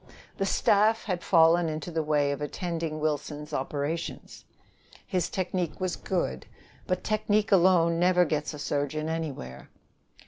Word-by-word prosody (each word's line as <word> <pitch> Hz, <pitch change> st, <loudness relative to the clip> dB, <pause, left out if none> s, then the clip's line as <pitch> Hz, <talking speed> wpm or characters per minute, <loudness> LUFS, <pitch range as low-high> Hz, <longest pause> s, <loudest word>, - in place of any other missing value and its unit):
The 195 Hz, -, +1 dB
staff 215 Hz, +3 st, +3 dB
had 185 Hz, -4 st, -2 dB
fallen 165 Hz, -1 st, +4 dB
into 155 Hz, +2 st, -5 dB
the 160 Hz, -1 st, 0 dB
way 150 Hz, -2 st, +1 dB
of 140 Hz, -, -4 dB
attending 165 Hz, 0 st, -3 dB
Wilson's 150 Hz, 0 st, -3 dB
operations. 145 Hz, +5 st, -4 dB, 0.6 s
His 180 Hz, -3 st, -1 dB
technique 185 Hz, -3 st, -2 dB
was 185 Hz, -1 st, -1 dB
good; 170 Hz, -, -3 dB, 0.4 s
but 185 Hz, 0 st, -1 dB
technique 215 Hz, 0 st, +1 dB
alone 170 Hz, -3 st, +4 dB
never 180 Hz, 0 st, +4 dB
gets 150 Hz, -1 st, -2 dB
a -, -, -8 dB
surgeon 145 Hz, +1 st, -2 dB
anywhere. 150 Hz, -, -5 dB
165 Hz, 135 wpm, -27 LUFS, 150-185 Hz, 0.6 s, fallen